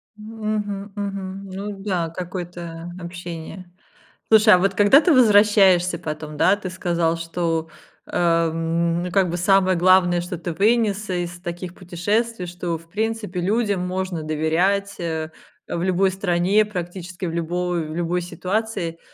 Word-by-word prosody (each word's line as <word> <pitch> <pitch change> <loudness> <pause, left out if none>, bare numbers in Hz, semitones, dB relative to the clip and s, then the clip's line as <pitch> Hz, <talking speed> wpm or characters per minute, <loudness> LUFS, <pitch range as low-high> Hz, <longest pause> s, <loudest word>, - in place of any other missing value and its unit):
Мгм, 210 -2 -4
мгм. 195 -1 -5
Ну 200 +2 -5
да. 175 -5 -1
Какое-то, 175 -1 -6
э, - - -9
общение. 175 +1 -8 0.6
Слушай, 215 -1 +7
а 180 - +7
вот 195 +1 +1
когда 205 +9 +6
ты 345 - +3
возвращаешься 205 -6 +5
потом, 155 -1 -6
да, 190 +6 +4
ты 195 -2 -6
сказал 170 -2 0
что, 165 -1 -2 0.4
э, - - -4
м, 170 +1 +1
как 190 -1 +2
бы, 175 - -2
самое 185 0 +3
главное, 180 -1 +4
что 175 0 -5
ты 170 0 -4
вынес 210 +1 +1
из 175 -1 -3
таких 175 0 -6
путешествий, 195 +4 -2
что 175 -1 -4
в 165 +1 -19
принципе 210 -2 -2
людям 200 -1 0
можно 185 -3 -3
доверять, 175 +7 0
э, 160 -2 -3 0.4
в 170 - -3
любой 190 +1 +2
стране, 190 +2 +2
практически 180 -2 -6
в 165 - -2
любой 175 0 -1
любой 175 +1 -1
ситуации. 180 0 -3
180 Hz, 140 wpm, -22 LUFS, 170-200 Hz, 0.6 s, Слушай